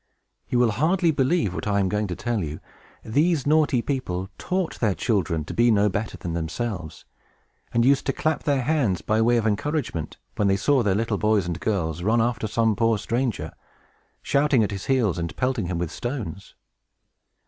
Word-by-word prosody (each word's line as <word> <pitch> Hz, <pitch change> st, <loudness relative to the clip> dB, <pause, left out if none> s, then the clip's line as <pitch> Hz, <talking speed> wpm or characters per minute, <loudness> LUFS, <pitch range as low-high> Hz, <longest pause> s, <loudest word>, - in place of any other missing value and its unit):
You 125 Hz, -, +1 dB
will 120 Hz, -2 st, +4 dB
hardly 165 Hz, -, +2 dB
believe 135 Hz, -, +1 dB
what 95 Hz, -, -4 dB
I 100 Hz, -1 st, +2 dB
am 95 Hz, -, +2 dB
going 105 Hz, +2 st, -1 dB
to 90 Hz, -, -4 dB
tell 115 Hz, -2 st, -2 dB
you. 75 Hz, -1 st, -5 dB, 0.5 s
These 150 Hz, +6 st, +1 dB
naughty 145 Hz, -5 st, +3 dB
people 95 Hz, -9 st, -3 dB
taught 185 Hz, -2 st, -2 dB
their 105 Hz, -5 st, +1 dB
children 95 Hz, -, 0 dB
to -, -, -6 dB
be 120 Hz, +1 st, +3 dB
no 105 Hz, -2 st, +4 dB
better 105 Hz, +3 st, -3 dB
than 85 Hz, -, -5 dB
themselves, 85 Hz, +1 st, -4 dB, 0.7 s
and 115 Hz, 0 st, +2 dB
used 140 Hz, +1 st, +3 dB
to -, -, +3 dB
clap 155 Hz, -1 st, -1 dB
their 140 Hz, -3 st, +1 dB
hands, 125 Hz, -, +1 dB
by 110 Hz, +1 st, +1 dB
way 120 Hz, +1 st, +4 dB
of 115 Hz, -, 0 dB
encouragement, 110 Hz, -, -2 dB, 0.2 s
when 105 Hz, -, +2 dB
they 95 Hz, 0 st, +3 dB
saw 135 Hz, +6 st, +2 dB
the 100 Hz, -4 st, +1 dB
little 110 Hz, -2 st, -1 dB
boys 105 Hz, -3 st, +2 dB
and 85 Hz, 0 st, -3 dB
girls 85 Hz, -5 st, -1 dB
run 110 Hz, +6 st, +2 dB
after 115 Hz, -1 st, 0 dB
some 110 Hz, 0 st, +1 dB
poor 115 Hz, 0 st, +2 dB
stranger, 110 Hz, -, -2 dB, 0.7 s
shouting 140 Hz, -4 st, +3 dB
at 105 Hz, -, -1 dB
his 100 Hz, -1 st, -5 dB
heels 115 Hz, -10 st, +1 dB
and 85 Hz, -1 st, -4 dB
pelting 125 Hz, -7 st, 0 dB
him 90 Hz, -1 st, -2 dB
with 85 Hz, -1 st, -3 dB
stones. 110 Hz, -, -5 dB
110 Hz, 190 wpm, -24 LUFS, 95-130 Hz, 0.7 s, will